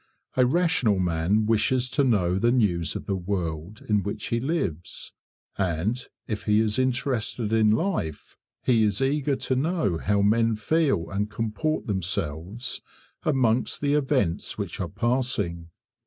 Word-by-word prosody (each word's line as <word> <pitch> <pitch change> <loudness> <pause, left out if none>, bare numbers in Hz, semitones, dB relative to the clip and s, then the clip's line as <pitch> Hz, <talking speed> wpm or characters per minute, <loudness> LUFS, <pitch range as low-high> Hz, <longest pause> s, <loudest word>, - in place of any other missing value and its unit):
A 125 -1 +4
rational 160 - +2
man 90 +4 +1
wishes 120 +4 +2
to 140 +3 +2
know 95 -7 +2
the 120 +3 +3
news 90 -10 +1
of - - -5
the 100 - -1
world 90 0 -4
in 105 -2 +2
which 100 +2 -4
he 115 - +1
lives; 100 - -3 0.5
and 95 +7 0 0.2
if 105 -2 -4
he 105 0 +4
is 110 +1 +1
interested 120 -3 0
in 110 -1 +4
life, 110 - -1 0.3
he 115 -3 +3
is 105 -2 +1
eager 140 +1 +1
to 130 - -1
know 145 - 0
how 100 0 +1
men 115 +2 +3
feel 110 - +1
and 100 +1 -1
comport 115 +8 -2
themselves 95 +1 -3 0.4
amongst 130 -5 +1
the 145 0 +1
events 120 - 0
which - - -4
are - - -2
passing. 120 -9 -1
110 Hz, 145 wpm, -26 LUFS, 95-130 Hz, 0.5 s, A